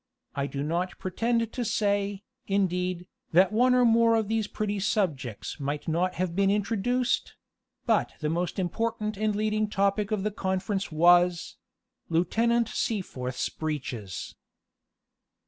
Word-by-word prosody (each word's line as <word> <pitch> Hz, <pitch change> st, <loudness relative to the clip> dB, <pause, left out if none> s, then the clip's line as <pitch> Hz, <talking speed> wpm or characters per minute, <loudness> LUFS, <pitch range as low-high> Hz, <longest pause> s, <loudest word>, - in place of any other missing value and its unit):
I 140 Hz, 0 st, -1 dB
do 140 Hz, 0 st, -4 dB
not 170 Hz, +4 st, -2 dB
pretend 230 Hz, +4 st, -1 dB
to 245 Hz, -, -2 dB
say, 205 Hz, -2 st, 0 dB, 0.2 s
indeed, 180 Hz, -2 st, 0 dB, 0.3 s
that 185 Hz, +3 st, +5 dB
one 250 Hz, +3 st, +4 dB
or 250 Hz, -1 st, +5 dB
more 230 Hz, 0 st, +5 dB
of 220 Hz, -2 st, 0 dB
these 220 Hz, -1 st, 0 dB
pretty 205 Hz, -1 st, -2 dB
subjects 155 Hz, -, -2 dB
might 145 Hz, +3 st, -3 dB
not 175 Hz, +3 st, 0 dB
have 180 Hz, -2 st, -2 dB
been 195 Hz, 0 st, +3 dB
introduced; 225 Hz, +5 st, 0 dB, 0.5 s
but -, -, +2 dB
the 150 Hz, -, -2 dB
most 170 Hz, +3 st, -1 dB
important 215 Hz, +3 st, -2 dB
and 215 Hz, +1 st, 0 dB
leading 215 Hz, 0 st, 0 dB
topic 200 Hz, 0 st, +1 dB
of 215 Hz, -3 st, -1 dB
the 210 Hz, -, 0 dB
conference 190 Hz, 0 st, -2 dB
was 175 Hz, +2 st, +4 dB, 0.5 s
Lieutenant 225 Hz, +8 st, +2 dB
Seaforth's 130 Hz, -, -2 dB
breeches. 130 Hz, -, -5 dB
195 Hz, 130 wpm, -27 LUFS, 175-215 Hz, 0.5 s, that